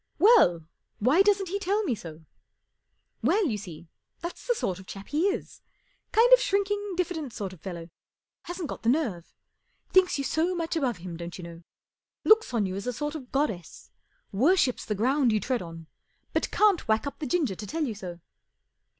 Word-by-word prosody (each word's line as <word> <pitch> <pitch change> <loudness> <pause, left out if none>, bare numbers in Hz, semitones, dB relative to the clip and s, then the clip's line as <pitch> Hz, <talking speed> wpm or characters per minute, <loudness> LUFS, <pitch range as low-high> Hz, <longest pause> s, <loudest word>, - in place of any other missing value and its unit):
" - - -47
Well, 335 - +5 0.3
why 260 - +4
doesn't 390 -2 +3
he 400 +3 -2
tell 405 +3 0
me 320 - 0
so? 165 -6 -9 0.3
" - - -54
" - - -49
Well, 420 -1 +3
you 220 -9 -1
see, 170 -4 -10 0.3
that's 345 +7 -7
the 485 - +2
sort 185 - -2
of 190 - -13
chap 195 0 -9
he 315 +6 +2
is. 400 - -4 0.5
Kind 475 +3 +6
of - - +9
shrinking, 405 -2 0
diffident 320 -9 -2
kind 195 -3 -4
of 175 - -15
fellow. 170 -3 -6 0.6
Hasn't 350 -2 -4
got - - -7
the 230 - +1
nerve. 235 - 0 0.6
Thinks 375 -3 +4
you 280 - -2
so 330 +6 0
much 335 -1 -2
above 260 - 0
him, 175 -1 -7
don't 170 +1 -7
you 180 - -9
know. 170 0 -9 0.6
Looks 440 -5 +5
on 230 -4 +1
you 185 0 -3
as 200 +4 -5
a 250 - -1
sort 295 +4 -3
of 270 -6 -8
goddess. 220 - -3 0.4
Worships 265 - +2
the 210 - -2
ground 255 +4 +2
you 215 - +2
tread 245 +4 -1
on, 165 -2 -9 0.5
but - - 0
can't 410 -8 +3
whack 220 +3 +2
up 280 - -6
the 295 - -3
ginger 285 - +1
to 210 +3 -8
tell 320 +6 -2
you 250 -7 -2
so." 180 -4 -8
265 Hz, 200 wpm, -27 LUFS, -, 0.6 s, of